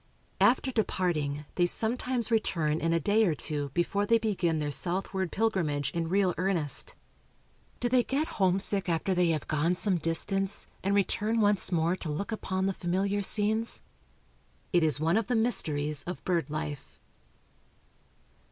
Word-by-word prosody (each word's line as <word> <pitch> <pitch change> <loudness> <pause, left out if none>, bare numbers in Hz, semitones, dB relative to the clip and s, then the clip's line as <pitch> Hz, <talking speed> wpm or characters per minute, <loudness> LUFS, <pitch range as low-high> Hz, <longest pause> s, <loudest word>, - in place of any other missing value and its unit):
After 260 +2 +3
departing, 160 - -1
they 175 -1 +2
sometimes 240 +4 +1
return 165 -8 +1
in 165 - 0
a 165 - +2
day 205 +7 +2
or 165 -5 +1
two 145 +2 -3
before 200 +4 0
they 230 - +5
begin 195 -7 0
their 150 -1 -2
southward 185 +4 -2
pilgrimage 160 - 0
in 165 0 -3
real 190 -1 +2
earnest. 180 -6 0 0.8
Do 245 - 0
they 245 0 +3
get 290 +6 -1
homesick 190 0 +2
after 170 +3 0
they 180 -1 +2
have 160 -3 -1
gone 160 +4 +1
some 185 0 +1
distance, 195 +5 0 0.2
and 195 +1 +1
return 210 +3 +1
once 205 -3 +2
more 170 +1 +1
to 165 - -6
look 155 +9 -4
upon 190 -3 -2
the 195 - 0
familiar 195 +3 -1
scenes? 215 +3 0 0.9
It 175 -2 +4
is 155 -2 +2
one 165 +5 +2
of 225 - -1
the 245 - 0
mysteries 150 - 0
of 180 - -7
bird 170 -4 0
life. 150 -2 -6
185 Hz, 155 wpm, -29 LUFS, 160-205 Hz, 0.9 s, they